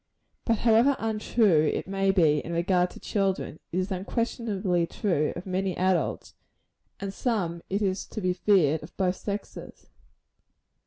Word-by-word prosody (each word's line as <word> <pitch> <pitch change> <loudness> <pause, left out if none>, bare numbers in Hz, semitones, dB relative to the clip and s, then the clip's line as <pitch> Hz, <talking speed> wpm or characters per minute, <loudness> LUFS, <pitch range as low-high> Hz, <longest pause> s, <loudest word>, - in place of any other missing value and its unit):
But 230 -2 +2
however 235 +5 +4
untrue 215 -7 +2
it - - -3
may 195 0 0
be 160 -6 +4
in 170 - -6
regard 180 +1 +2
to - - -12
children, 195 -6 -1
it 175 - -2
is 185 +2 -1
unquestionably 195 -3 -1
true 165 -8 0
of 175 - -7
many 190 -1 -2
adults; 185 -4 0 0.7
and 200 - -4
of - - -7
some, 190 -8 -1
it 200 +2 0
is 190 -1 -1
to - - -6
be 185 -3 0
feared, 180 -5 +3
of 155 - -13
both 185 -1 +1
sexes. 205 0 -7
190 Hz, 155 wpm, -27 LUFS, 175-205 Hz, 0.7 s, however